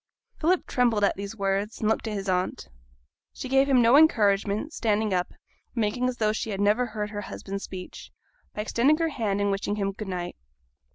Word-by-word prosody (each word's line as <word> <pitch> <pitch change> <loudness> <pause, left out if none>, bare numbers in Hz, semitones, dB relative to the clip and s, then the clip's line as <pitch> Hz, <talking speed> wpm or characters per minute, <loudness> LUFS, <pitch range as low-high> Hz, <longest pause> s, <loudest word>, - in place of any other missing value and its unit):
Philip 350 +3 +2
trembled 235 -5 +1
at 200 - +3
these 200 +2 -6
words, 200 +1 -1
and 215 - 0
looked 220 +1 0
at 215 - -3
his 195 -1 -4
aunt. 180 -1 -1 0.6
She - - -6
gave 270 +2 +3
him 255 -3 +5
no 235 +3 +6
encouragement, 215 -2 +3
standing 215 -2 0
up, 180 -1 +1
and - - -21 0.4
making 235 +3 0
as 250 - -5
though 215 -1 +1
she 220 - -3
had 195 -2 -3
never 210 +5 +2
heard 210 -2 -4
her 205 -1 -4
husband's 195 0 -6
speech, 185 -1 -9 0.4
by 210 - -2
extending 260 +7 +3
her 330 0 0
hand, 215 -8 -1
and 205 0 +1
wishing 200 +1 -1
him 200 -1 -1
'good 205 +1 -7
night.' 180 -2 -4
210 Hz, 205 wpm, -26 LUFS, 200-240 Hz, 0.6 s, no